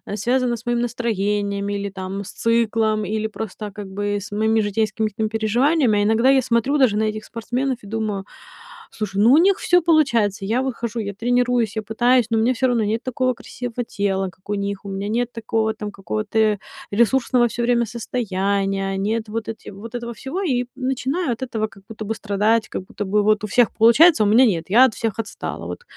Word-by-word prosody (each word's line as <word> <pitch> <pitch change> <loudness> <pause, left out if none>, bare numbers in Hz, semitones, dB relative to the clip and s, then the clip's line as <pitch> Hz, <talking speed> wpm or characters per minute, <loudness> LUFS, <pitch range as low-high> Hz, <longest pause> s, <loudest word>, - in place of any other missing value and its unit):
связано 245 +3 0
с 230 - -15
моим 240 0 0
настроением, 205 -4 -1
или, 200 0 -2
там, 195 +1 -5
с - - -9
циклом, 225 -2 +1
или 215 +2 -1
просто, 215 -1 -6
как 200 0 -8
бы, 205 +1 -2
с 205 +1 -9
моими 220 +2 +2
житейскими 215 +1 0
ким 215 +1 -2
переживаниями, 225 +2 +2
а - - +2
иногда 225 +5 +3
я 265 -1 +4
смотрю 245 +4 +1
даже 225 -6 +4
на 220 - +1
этих 215 0 -3
спортсменов 245 +3 -2
и 200 - -11
думаю: 215 -3 -3 0.7
"Слушай, 200 -2 -2
ну, 235 - +6
у 295 - +7
них 380 +3 +4
всё 355 0 +3
получается". 235 - +2
Я 230 +6 +1
выхожу, 235 -3 -3
я 200 -2 -3
тренируюсь, 245 -1 +1
я 220 - -1
пытаюсь, 240 +2 +2
но 225 - +1
мне 235 +3 +3
всё 260 +1 +1
равно 240 -3 +1
нет 220 +2 -1
такого 255 0 0
красивого 245 0 -6
тела, 195 -3 -1
как 185 +2 -23
у - - 0
них. 200 -1 -3
У - - -6
меня 195 +1 -4
нет 240 +2 -1
такого, 220 -1 -1
там, 210 - -6
какого-то 210 +2 0 0.3
ресурсного 240 +2 +3
всё 240 +2 -3
время 235 0 +2
состояния, 195 -4 -1
они 195 +2 -1
это 220 -2 -4
вот 225 0 -3
эти 225 - -7
вот 220 +4 -10
этого 235 0 -4
всего. 270 - -5
И 250 -7 0
начинаю 265 +4 -1
от 235 - -10
этого 225 -4 -2
как 195 -2 -18
будто 220 -1 -7
бы 225 - -2
страдать, 220 +2 +1
как - - -5
будто 205 - -6
бы 205 +2 +2
вот 215 0 +2
у - - -2
всех 240 +3 +3
получается, 235 +4 +6
а - - +2
у - - +2
меня 240 +5 +6
нет. 170 -8 0
Я 240 +7 +7
от 235 - 0
всех 225 -3 -2
отстала. 225 - -5
Вот - - -7
220 Hz, 210 wpm, -21 LUFS, 205-245 Hz, 0.7 s, у